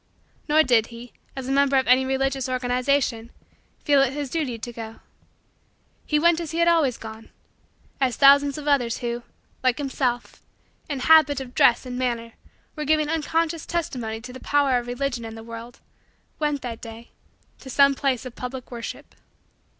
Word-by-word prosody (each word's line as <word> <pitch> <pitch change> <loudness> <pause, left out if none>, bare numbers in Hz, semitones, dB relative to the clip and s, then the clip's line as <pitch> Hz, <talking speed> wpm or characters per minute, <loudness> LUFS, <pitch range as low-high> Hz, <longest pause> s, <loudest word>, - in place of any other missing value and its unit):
Nor 310 +1 +5
did 240 -5 +3
he, 235 +1 -11 0.2
as 265 -1 -6
a - - -2
member 275 0 +3
of 260 - +2
any 255 +1 +4
religious 270 0 -1
organization, 250 -1 0 0.6
feel 285 -2 +5
it 270 -1 +1
his 285 -2 -4
duty 285 -8 -2
to 240 +2 -7
go. 225 -1 -8 1.1
He 300 - +2
went 340 +2 +4
as 335 -2 -5
he 325 - -4
had 340 0 +3
always 315 -8 +3
gone 220 0 -10 0.7
as 260 -4 +1
thousands 280 0 +5
of 300 -1 -7
others 245 -5 +2
who, 240 0 -3 0.4
like 255 -1 +2
himself, 260 -4 -2 0.5
in 280 -3 -3
habit 310 -2 +5
of 255 -2 -8
dress 240 +2 +4
and 250 0 -5
manner 235 -2 -2 0.4
were 300 - -4
giving 305 0 +2
unconscious 325 0 -1
testimony 245 -10 -3
to 250 +2 -9
the 260 - -9
power 280 -3 +2
of 240 - -9
Religion 245 -1 -3
in 225 0 -7
the 225 - -9
world, 230 +1 -10 0.6
went, 295 -2 -1
that 235 -2 -6
day, 230 0 -10 0.5
to 265 - -11
some 280 +2 +5
place 265 -2 -1
of 250 - -7
public 255 +1 -7
worship. 235 -2 -7
260 Hz, 175 wpm, -24 LUFS, 240-285 Hz, 1.1 s, Nor